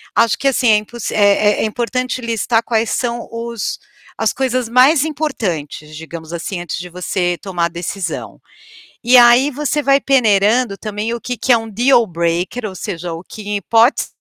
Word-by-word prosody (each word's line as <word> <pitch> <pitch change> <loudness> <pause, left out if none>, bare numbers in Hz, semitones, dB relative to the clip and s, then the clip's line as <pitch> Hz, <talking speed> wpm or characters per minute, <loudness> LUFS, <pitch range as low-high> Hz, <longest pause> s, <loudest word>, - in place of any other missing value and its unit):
Acho 230 -2 +3
que 275 - -1
assim, 255 -2 +1
é 210 - +6
impos 220 +2 -5
é 205 0 +3
é - - +1
importante 250 +3 -2
listar 230 0 0
quais 225 -1 0
são 240 -1 -2
os 230 -2 -4 0.4
as - - 0
coisas 255 -2 -1
mais 265 +5 +5
importantes, 180 - -4
digamos 165 0 -9
assim, 175 +2 -4
antes 175 - -5
de 180 0 -7
você 175 0 -2
tomar 175 -3 -2
a - - +1
decisão. 170 +1 -5 0.6
E 250 +2 +5
aí, 245 +3 +6
você 295 +2 -1
vai 275 0 +3
peneirando 225 -3 +2
também 215 +2 -4
o 235 - -6
que 250 - -4
que 260 - -3
é - - +6
um 225 -1 -5
dealbreaker 205 -3 +1
ou 190 - -7
seja, 175 -1 -5
o 165 - -7
que 215 +3 -11
em 205 - -1
hipótese 230 - +2
225 Hz, 175 wpm, -17 LUFS, 180-245 Hz, 0.6 s, é